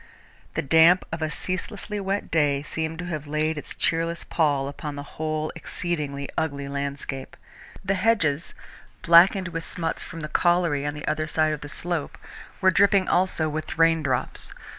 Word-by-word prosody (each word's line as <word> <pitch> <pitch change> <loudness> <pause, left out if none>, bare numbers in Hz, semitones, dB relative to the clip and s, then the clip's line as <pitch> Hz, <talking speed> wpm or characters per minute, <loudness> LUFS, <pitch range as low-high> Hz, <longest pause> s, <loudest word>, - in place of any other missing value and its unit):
The - - 0
damp 165 +5 +5
of 165 0 -4
a 155 - 0
ceaselessly 195 +5 -4
wet 195 +1 -2
day 145 -3 +2
seemed 160 +1 -3
to 175 - -5
have 155 -4 -4
laid 155 +2 0
its 150 - -7
cheerless 165 +2 0
pall 145 -4 +1
upon 145 +1 -6
the 145 - -6
whole 155 +1 -3
exceedingly 145 -5 -3
ugly 140 -3 -2
landscape. 140 -1 -5 0.5
The 195 - +2
hedges, 185 -7 +1 0.5
blackened 185 +3 +6
with 165 -1 -4
smuts 165 -1 -3
from 165 - -8
the 150 - -4
colliery 170 -3 +2
on 145 - -3
the 150 - -7
other 155 0 0
side 155 -1 +2
of 150 - -5
the 145 - -7
slope, 170 0 -3 0.4
were 190 -1 +5
dripping 200 -1 +4
also 180 -3 +2
with 155 +4 -4
raindrops. 160 -6 +1
160 Hz, 160 wpm, -25 LUFS, 145-175 Hz, 0.5 s, blackened